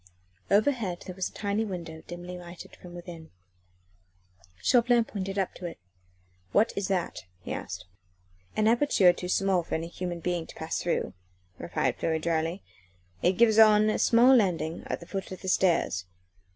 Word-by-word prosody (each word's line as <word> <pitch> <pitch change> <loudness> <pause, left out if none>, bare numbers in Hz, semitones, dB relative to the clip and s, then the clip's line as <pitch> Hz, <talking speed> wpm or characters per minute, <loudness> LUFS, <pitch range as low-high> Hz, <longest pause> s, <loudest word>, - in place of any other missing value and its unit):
Overhead 210 -4 +1
there 185 - -6
was 185 0 -3
a - - -23
tiny 205 +1 -1
window 170 -6 -6
dimly 175 +1 -7
lighted 175 0 -10
from 175 -1 -12
within. 170 -2 -9 1.3
Chauvelin 240 - +4
pointed 195 -3 -5
up 190 -2 0
to 180 - -6
it. 170 - -8 0.8
"What 220 +3 +3
is 200 -1 -1
that?" 185 -3 -2 0.2
he - - -4
asked. 90 - -6 0.7
"An 215 0 +2
aperture 230 -7 +4
too 180 0 -6
small 190 -1 +2
for 170 - -4
any 165 +1 -3
human 175 -1 -5
being 175 -1 -2
to - - -12
pass 160 0 -3
through," 175 - -1 0.5
replied - - -1
Fleury 160 -1 0
drily. 165 +3 -1 0.6
"It 180 - +3
gives 220 +1 +4
on 215 -1 +6
a - - -1
small 245 +3 +6
landing 175 -7 +1
at - - -3
the - - -9
foot 195 -2 -5
of 185 - -8
the - - -6
stairs. 170 - +2
185 Hz, 165 wpm, -28 LUFS, 170-210 Hz, 1.3 s, on